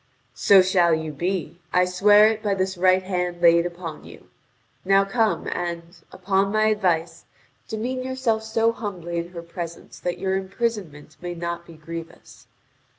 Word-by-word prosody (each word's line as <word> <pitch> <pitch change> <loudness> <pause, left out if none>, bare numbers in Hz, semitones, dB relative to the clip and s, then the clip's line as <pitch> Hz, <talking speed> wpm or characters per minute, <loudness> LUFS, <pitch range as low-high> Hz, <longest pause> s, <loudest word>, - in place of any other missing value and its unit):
"So 195 -2 +6
shall 180 -3 +3
you 160 -1 -4
be: 175 +1 -3
I 180 0 +4
swear 205 +4 +5
it 220 -1 -3
by 205 -3 0
this 190 0 -1
right 185 +1 +3
hand 180 -2 -2
laid 170 0 +5
upon 170 -3 -8
you!. - - -14 0.5
Now 195 +1 +4
come 220 +1 0
and, 170 0 -4 0.2
upon 195 +1 0
my 215 0 +3
advice, 180 -6 0 0.4
demean 245 +4 -3
yourself 255 -4 -1
so 225 +1 +1
humbly 180 -7 -5
in 170 0 -3
her 170 -2 -8
presence 170 0 -8
that 175 0 -3
your 190 +1 -1
imprisonment 190 -7 -4
may 175 0 -5
not 170 0 -5
be 170 - -12
grievous. 165 -4 -10
185 Hz, 155 wpm, -23 LUFS, 170-205 Hz, 0.5 s, So